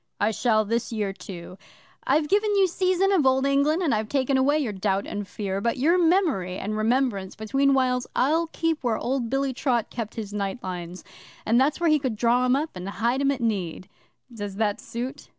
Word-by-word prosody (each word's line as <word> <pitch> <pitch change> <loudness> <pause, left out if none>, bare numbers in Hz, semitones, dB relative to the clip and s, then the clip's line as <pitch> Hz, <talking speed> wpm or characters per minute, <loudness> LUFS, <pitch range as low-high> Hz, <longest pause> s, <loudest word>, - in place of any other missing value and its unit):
'I 210 - +2
shall 215 -1 +2
this 230 +2 -1
year, 210 -3 -2
too. 185 -1 -10 0.5
I've 295 +3 +2
given 415 +3 +2
you 390 -1 +5
seizin 370 +2 +1
of 370 -6 +3
Old 265 0 +3
England, 285 +5 +2
and 305 - +2
I've 215 0 -1
taken 270 -1 +1
away 275 +3 +3
your 255 -9 -1
Doubt 195 0 -1
and 205 -1 -5
Fear, 195 -2 -4
but 235 +5 0
your 310 +7 +3
memory 320 - +2
and 215 +2 -3
remembrance 215 -3 0
between 270 +6 +1
whiles 250 -1 +1
I'll 320 +6 +2
keep 325 -2 -2
where 235 -3 +1
old 250 -2 -2
Billy 270 +1 0
Trott 245 -3 -1
kept 230 -2 -5
his 210 -3 -6
night 200 +1 -2
lines 180 -1 -6 0.4
and 235 +3 +3
that's 285 +4 +1
where 340 -2 +3
he 305 - +4
could 260 -5 -2
draw 235 +3 +2
'em 250 +1 +3
up 305 +3 -2
and 180 +1 -6
hide 235 +6 0
'em 275 - +2
at 275 -2 -1
need. 190 -5 -2 0.4
Does 205 -3 -6
that 205 -1 -1
suit? 245 +3 -6
245 Hz, 205 wpm, -25 LUFS, 210-280 Hz, 0.5 s, you